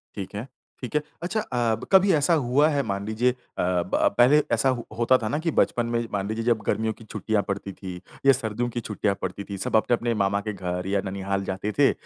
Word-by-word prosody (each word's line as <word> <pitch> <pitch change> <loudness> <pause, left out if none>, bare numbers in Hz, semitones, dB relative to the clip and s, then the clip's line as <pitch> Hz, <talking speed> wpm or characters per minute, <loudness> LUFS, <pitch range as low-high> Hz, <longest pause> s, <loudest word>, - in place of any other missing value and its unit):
ठीक 100 -1 -6
है, 110 +5 -5 0.3
ठीक 125 +4 -6
है। 150 - +3 0.2
अच्छा 215 +5 -1
अ, 120 - 0
ब 115 - -9
कभी 190 0 +6
ऐसा 150 +3 +3
हुआ 140 +5 +4
है 145 -2 +1
मान 100 0 -3
लीजिए 120 +3 +2
अ, - - -10 0.2
ब 90 +2 +1
पहले 135 +5 +6
ऐसा 115 +4 +3
हो 120 - -7
होता 120 +2 +4
था 110 - -3
ना 150 - 0
कि 165 - +2
बचपन 120 -1 +2
में, 115 0 -1
मान 100 0 -1
लीजिए 110 +1 -2
जब 115 -3 +2
गर्मियों 110 0 0
की 115 - -15
छुट्टियाँ 105 0 -1
पड़ती 100 0 -3
थीं 90 -2 -8 0.3
या 135 - +9
सर्दियों 120 -1 -2
की 120 0 -3
छुट्टियाँ 105 -2 -1
पड़ती 95 +2 -4
थीं, 100 -1 -6
सब 95 - -2
अपने-अपने 120 +1 +2
मामा 100 +1 +1
के 105 - -1
घर 90 0 -4
या 100 0 +1
ननिहाल 100 0 -2
जाते 95 +3 -3
थे, 140 - +6
110 Hz, 235 wpm, -25 LUFS, 100-125 Hz, 0.3 s, या